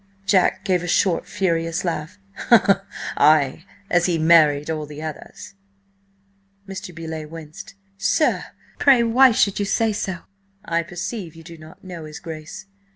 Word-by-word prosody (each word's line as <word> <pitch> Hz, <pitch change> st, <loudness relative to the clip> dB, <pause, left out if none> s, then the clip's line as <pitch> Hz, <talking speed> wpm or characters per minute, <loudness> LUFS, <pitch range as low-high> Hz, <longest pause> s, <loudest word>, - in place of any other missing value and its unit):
Jack 195 Hz, -2 st, +2 dB
gave 185 Hz, -3 st, +1 dB
a 175 Hz, -, -5 dB
short, 175 Hz, 0 st, +1 dB
furious 165 Hz, -2 st, -1 dB
laugh. 155 Hz, -, -4 dB, 1.0 s
"Ay! 150 Hz, +1 st, +3 dB, 0.2 s
As 175 Hz, -1 st, +2 dB
he 175 Hz, -2 st, +1 dB
married 155 Hz, -3 st, +4 dB
all 155 Hz, -1 st, -4 dB
the 150 Hz, 0 st, -10 dB
others!" 155 Hz, +4 st, -8 dB, 1.1 s
Mr. 195 Hz, 0 st, -7 dB
Beauleigh 160 Hz, -2 st, -7 dB
winced. 160 Hz, +3 st, -11 dB, 0.2 s
"Sir! 305 Hz, +9 st, +1 dB, 0.3 s
Pray 265 Hz, -4 st, +5 dB
why 250 Hz, +3 st, +5 dB
should 205 Hz, -3 st, +1 dB
you 205 Hz, -, 0 dB
say 220 Hz, +2 st, +1 dB
so?" 190 Hz, -4 st, -4 dB, 0.4 s
"I 170 Hz, -4 st, 0 dB
perceive 175 Hz, +1 st, -6 dB
you 165 Hz, -, -13 dB
do 170 Hz, +1 st, -11 dB
not 155 Hz, 0 st, -15 dB
know 175 Hz, -4 st, -8 dB
his 150 Hz, -1 st, -9 dB
Grace. 160 Hz, +2 st, -9 dB
170 Hz, 145 wpm, -22 LUFS, 155-190 Hz, 1.1 s, Pray